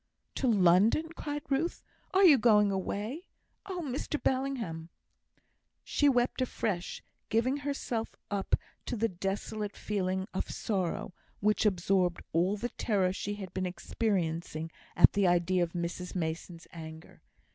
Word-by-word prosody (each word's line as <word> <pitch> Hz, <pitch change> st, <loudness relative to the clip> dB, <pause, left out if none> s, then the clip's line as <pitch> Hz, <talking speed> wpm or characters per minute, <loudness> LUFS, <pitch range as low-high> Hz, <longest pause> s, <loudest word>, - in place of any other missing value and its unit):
"To 265 Hz, -, 0 dB
London!" 205 Hz, -, +4 dB
cried 290 Hz, -1 st, -4 dB
Ruth; 290 Hz, +5 st, -1 dB, 0.3 s
"are 385 Hz, +1 st, +4 dB
you 295 Hz, -7 st, +8 dB
going 210 Hz, -3 st, +5 dB
away? 210 Hz, -, -3 dB, 0.4 s
Oh, 365 Hz, -3 st, -3 dB
Mr 280 Hz, +2 st, -2 dB
Bellingham!" 245 Hz, -12 st, -1 dB, 0.9 s
She 290 Hz, -, +3 dB
wept 250 Hz, 0 st, +2 dB
afresh, 205 Hz, -7 st, -2 dB, 0.3 s
giving 240 Hz, +5 st, +2 dB
herself 275 Hz, -5 st, -3 dB, 0.2 s
up 200 Hz, -1 st, +1 dB, 0.3 s
to -, -, -1 dB
the 230 Hz, 0 st, +1 dB
desolate 200 Hz, +3 st, -3 dB
feeling 190 Hz, -2 st, -1 dB
of 190 Hz, -, -2 dB
sorrow, 185 Hz, -4 st, -2 dB, 0.3 s
which 210 Hz, +1 st, +3 dB
absorbed 180 Hz, -2 st, +1 dB
all 180 Hz, +5 st, +2 dB
the 240 Hz, +4 st, -3 dB
terror 195 Hz, -7 st, +1 dB
she 205 Hz, +2 st, -3 dB
had 190 Hz, -3 st, -8 dB
been 185 Hz, 0 st, -1 dB
experiencing 170 Hz, -5 st, -2 dB, 0.2 s
at 175 Hz, -, +7 dB
the 200 Hz, -2 st, +3 dB
idea 175 Hz, +1 st, +3 dB
of 170 Hz, -1 st, 0 dB
Mrs 175 Hz, +1 st, -4 dB
Mason's 165 Hz, 0 st, -3 dB
anger. 160 Hz, -1 st, -10 dB
200 Hz, 135 wpm, -31 LUFS, 180-245 Hz, 0.9 s, you